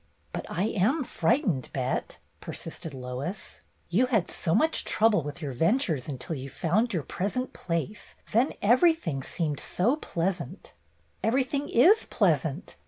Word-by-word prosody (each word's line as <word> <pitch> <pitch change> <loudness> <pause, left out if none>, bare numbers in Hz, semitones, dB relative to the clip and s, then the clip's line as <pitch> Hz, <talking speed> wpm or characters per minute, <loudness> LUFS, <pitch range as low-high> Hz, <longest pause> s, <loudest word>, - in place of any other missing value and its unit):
But - - -4
I 180 - -1
am 235 - +2
frightened. 190 - +1
Bet," 130 -1 -2 0.2
persisted 165 - -7
Lois. 135 +9 -5 0.3
"You 205 +9 +3
THE - - -5
PICNIC - - -14
29 - - -12
had - - -12
so 165 - 0
much 315 +9 +2
trouble 215 -4 +3
with 150 +3 -7
your 140 - -2
ventures 165 - +1
until 135 +3 -4
you 135 0 -6
found 205 - +1
your 170 -7 -1
present 230 - -2
place, 175 +4 -4 0.2
then 240 +6 +3
everything 240 - +3
seemed 150 +1 -2
so 230 +10 +1
pleasant/' 180 - -3 0.5
"Everything 265 +4 0
is 375 - +5
pleasant. 160 - 0
185 Hz, 150 wpm, -28 LUFS, 150-240 Hz, 0.5 s, is